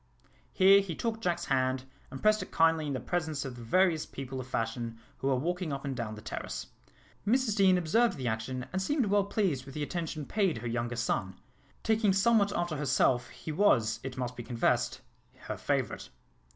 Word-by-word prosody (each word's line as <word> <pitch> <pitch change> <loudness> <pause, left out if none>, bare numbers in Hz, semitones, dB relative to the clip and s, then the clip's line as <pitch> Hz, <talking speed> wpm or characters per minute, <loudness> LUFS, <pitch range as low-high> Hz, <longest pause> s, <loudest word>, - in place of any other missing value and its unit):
Here 195 +1 +6
he 185 -5 -5
took 225 +3 -2
Jack's 175 -4 -1
hand, 130 -1 0 0.2
and 135 - -9
pressed 215 0 +4
it - - -7
kindly 160 -1 +3
in 135 -3 -2
presence 160 -5 -2
of 130 -2 -6
the 120 - -10
various 165 +6 +3
people 135 -1 -6
of 130 - -6
fashion 115 -1 -3 0.2
who 135 - -2
were 135 - +3
walking 175 +4 -2
up 140 0 -4
and 135 -1 -2
down 115 -3 -4
the 105 - -11
terrace. - - -5 0.6
Mrs 235 0 +2
Deane 190 -3 +5
observed 195 +5 +2
the 130 -2 -3
action, 120 +3 -3
and 190 - 0
seemed 275 +5 +1
well 205 0 +2
pleased 190 - 0
with 135 - -11
the 150 - -2
attention 160 -2 -4
paid 195 - +1
her 115 +1 -5
younger 120 +1 -2
son. 100 -5 -1 0.5
Taking 220 -3 +3
somewhat 205 +1 +4
after 175 -3 -1
herself, 130 -3 +2
he 155 - -7
was, 115 - +3
it 130 -1 -6
must 125 -1 -3
be 120 - -6
confessed, 120 0 0 0.4
her - - -5
favourite. - - -2
150 Hz, 190 wpm, -30 LUFS, 125-195 Hz, 0.6 s, Here